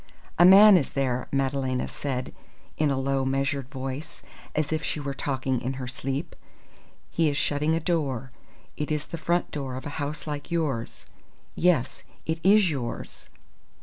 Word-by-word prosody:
"A 175 - +9
man 195 +2 +9
is 140 - 0
there," 130 -2 -1
Madalena 135 -2 0
said 130 -3 -4 0.4
in 150 -1 +2
a 135 - 0
low, 135 0 0
measured 135 0 -1
voice, 135 +2 -6 0.3
as 155 0 0
if 155 0 -1
she - - -2
were 140 -1 -3
talking 130 -2 -1
in 130 +2 -2
her 130 -1 -5
sleep. 135 +5 -4 0.8
"He 165 -2 +2
is 140 - -2
shutting 150 +3 +1
a - - +1
door. 140 -7 -1 0.4
It 150 0 -3
is 150 -1 -1
the 170 - -7
front 170 +2 0
door 135 -3 -4
of 130 - -7
a - - -3
house 145 +2 -4
like 145 -2 -5
yours. 150 -9 -2 0.5
Yes, 165 -8 +1 0.2
it 160 0 -1
is 195 -1 +5
yours. 125 -5 -5
140 Hz, 165 wpm, -26 LUFS, 130-160 Hz, 0.8 s, A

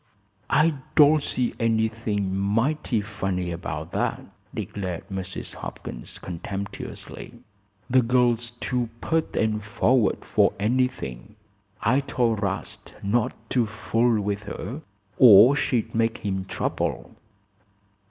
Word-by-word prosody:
"I 160 +2 +4 0.2
don't 150 0 +7
see 125 -3 -1
anything 110 -3 0
mighty 115 +5 +1
funny 95 -4 -3
about 85 +1 -5
that," - - -1 0.3
declared 90 -4 -5
Mrs. 95 -1 -5
Hopkins, - - -8
contemptuously. 100 +6 -7 0.5
"The 130 +1 +4
girl's 120 -1 +2
too 125 -2 -1
pert 160 +4 -1
and 110 -1 0
forward 115 +2 +2
for - - +3
anything. 105 - -1 0.5
I 120 +5 +4
told 120 -6 0
'Rast 95 -2 -4
not 110 +3 +1 0.2
to 120 -3 +2
fool 115 +1 +1
with 100 0 -2
her, 115 - -6 0.4
or 120 +2 +9
she'd 125 -5 0
make 115 0 +1
him 95 -2 -1
trouble." - - -3
110 Hz, 110 wpm, -25 LUFS, 100-125 Hz, 0.5 s, or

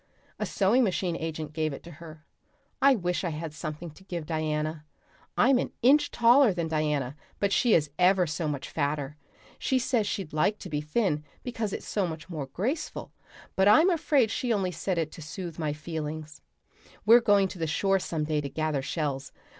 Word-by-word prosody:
A - - -1
sewing 215 +6 +3
machine 185 -4 0
agent 155 -2 -5
gave 155 -2 -1
it - - -9
to 170 - -10
her. 155 0 -12 0.6
I 275 0 +6
wish 180 -4 -1
I 175 - 0
had 155 0 -5
something 155 +2 -6
to 190 - -18
give 175 -4 -5
Diana. 155 -1 -2 0.5
I'm 250 +1 +5
an - - -3
inch 290 +4 +5
taller 240 -2 +5
than 170 -2 -1
Diana, 150 -4 -1 0.2
but 200 -1 +1
she 240 -3 +4
is 150 -3 +1
ever 180 0 +5
so 155 0 -3
much 145 -2 -3
fatter; 145 -1 -2 0.4
she 265 - +1
says 240 -4 +1
she'd 190 -7 -4
like 175 +7 +2
to 185 - -9
be 150 -1 -1
thin 150 -1 0 0.2
because 225 -4 -3
it's - - -6
so 200 -4 0
much 160 +1 -7
more 150 -5 -4
graceful, 235 - -3 0.4
but 190 +1 +3
I'm 315 - +6
afraid 285 -8 +2
she 245 - -1
only 195 -4 +1
said 180 +2 -2
it 160 -2 -1
to - - -10
soothe 170 +1 -7
my 155 -2 -1
feelings. 155 0 -6 0.6
We're 235 +3 +8
going 205 -3 +4
to 180 - -9
the 165 - -1
shore 195 +5 +2
some 165 -4 -3
day 150 -1 0
to 140 - -5
gather 155 -1 -1
shells. 140 -1 -3
170 Hz, 195 wpm, -28 LUFS, 155-205 Hz, 0.6 s, We're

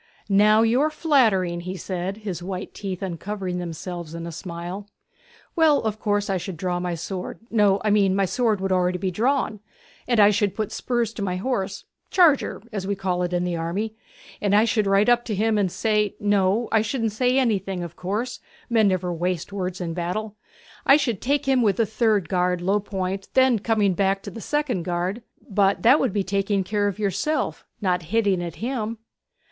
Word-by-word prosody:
'Now 210 +2 +5
you 235 +4 +3
are 305 - +3
flattering!' 225 - +2
he 185 +2 -5
said, 185 +2 -4
his 180 -4 -3
white 185 +1 -5
teeth 195 -2 -5
uncovering 185 0 -4
themselves 170 -1 -6
in 170 0 -5
a 170 - -5
smile. 175 +3 -6 0.7
'Well, 320 -4 +5
of 215 -1 -2
course 205 -1 0
I 195 - 0
should 175 0 -6
draw 180 +1 -1
my 175 -1 -2
sword 180 +3 -5
no, 205 -3 +4
I 210 - +3
mean 200 -2 +3
my 195 0 +2
sword 220 -1 0
would 195 - -1
be - - +2
already 180 +1 0
drawn; 230 +1 0 0.5
and 240 -3 +2
I 205 0 +7
should 205 -1 0
put 215 -1 -2
spurs 235 -3 -1
to 220 - -6
my 185 -2 -1
horse 195 -2 -2 0.2
charger, 325 - +3
as 195 -2 -3
we 200 - 0
call 185 -2 -1
it 180 0 -1
in 175 0 0
the 180 -1 -1
army; 180 +7 -2 0.5
and 205 -1 +2
I 215 +2 +5
should 215 -3 +1
ride 195 +1 +3
up 240 0 +4
to 215 - -2
him 220 +2 +1
and 190 -3 +1
say 210 -1 0
no, 205 +2 +2
I 220 - +4
shouldn't 225 0 -1
say 250 +4 +1
anything, 195 -7 0
of 170 -1 -8
course 210 +7 -3 0.3
men 220 -3 +4
never 185 -2 0
waste 175 +2 -2
words 185 -2 -3
in 170 -2 -3
battle; 185 +5 -3 0.5
I 275 - +7
should 240 -9 -1
take 285 +2 0
him 265 -2 +3
with 205 -5 +3
the 230 - +2
third 215 -4 +1
guard, 180 0 +1
low 195 +4 +1
point, 195 -1 -3
and - - -35
then 260 -3 +4
coming 210 -2 +2
back 195 +1 0
to 200 - -7
the 225 - -8
second 295 -7 -1
guard 180 +6 -2 0.2
' - - -36
'But 200 -1 +2
that 255 +6 +6
would 260 - +1
be 200 0 0
taking 195 +1 0
care 205 +2 0
of 200 - -3
yourself 215 - -1 0.2
not 180 -3 +1
hitting 195 +1 +1
at 170 - -6
him.' 230 -3 -2
200 Hz, 205 wpm, -24 LUFS, 180-220 Hz, 0.7 s, I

